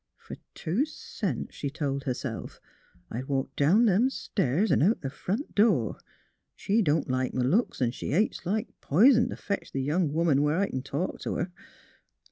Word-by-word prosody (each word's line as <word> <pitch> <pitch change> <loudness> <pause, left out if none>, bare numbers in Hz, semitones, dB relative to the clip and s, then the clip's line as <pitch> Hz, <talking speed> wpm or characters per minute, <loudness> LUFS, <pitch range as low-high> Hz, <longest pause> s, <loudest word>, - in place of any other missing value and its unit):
'' - - -57
Fer - - -7 0.2
two 185 - 0
cents," 315 - -4
she 140 - -4
told 140 -2 -3
herself, 125 -2 -4 0.5
"I'd 125 +4 -4
walk 135 -1 -2
down 185 +12 +4
them 220 +5 +4
stairs 190 - 0
'n' - - +3
out 200 +9 +3
th' 135 - -3
front 210 - -4
door. 200 - +2 0.6
She 215 +3 +1
don't 155 -5 +1
like 130 0 -1
m' 130 - +1
looks, 150 - +1
'n' 120 - +1
she - - -6
hates 195 +10 +1
like 215 +6 -1
p'ison 235 - +5
t' - - -5
fetch 200 -1 -4
the 135 - -2
young 155 +2 +1
woman 155 -3 +2
where 150 +2 +2
I 200 +1 +1
c'n 130 - -3
talk 145 +7 -3
t' - - -4
her. 175 +2 -2
165 Hz, 185 wpm, -28 LUFS, 135-210 Hz, 0.6 s, p'ison